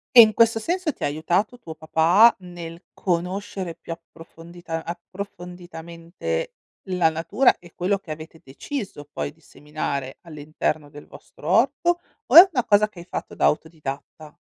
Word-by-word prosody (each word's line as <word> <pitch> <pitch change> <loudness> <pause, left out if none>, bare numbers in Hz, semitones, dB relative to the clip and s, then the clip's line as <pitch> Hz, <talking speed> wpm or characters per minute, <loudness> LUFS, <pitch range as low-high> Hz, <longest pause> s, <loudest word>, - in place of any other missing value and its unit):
E, 240 - +11
in 215 -2 +9
questo 225 -1 +4
senso, 345 +6 -1
ti - - -10
ha - - +3
aiutato 175 +10 0
tuo 165 -9 -9
papà, 165 +8 +5
nel 175 -1 -9
conoscere 180 0 -3
più 165 0 -7
approfondita 165 0 -9
approfonditamente, 175 - -6 0.3
la 180 -3 +3
natura 170 +11 +2
e 175 -1 -16
quello 195 +3 0
che 180 -5 -11
avete 160 +1 -9
deciso, 145 - -6
poi, 145 - -4
di 155 - -27
seminare 145 -3 -5
all'interno 150 -1 -3
del 145 0 -13
vostro 150 - -13
orto? 275 - +2 0.2
O - - 0
è 340 - +15
una 250 -7 0
cosa 210 0 +4
che 185 - -14
hai 170 - -10
fatto - - -6
da - - +1
autodidatta? 150 -1 -3
175 Hz, 155 wpm, -23 LUFS, 160-205 Hz, 0.3 s, è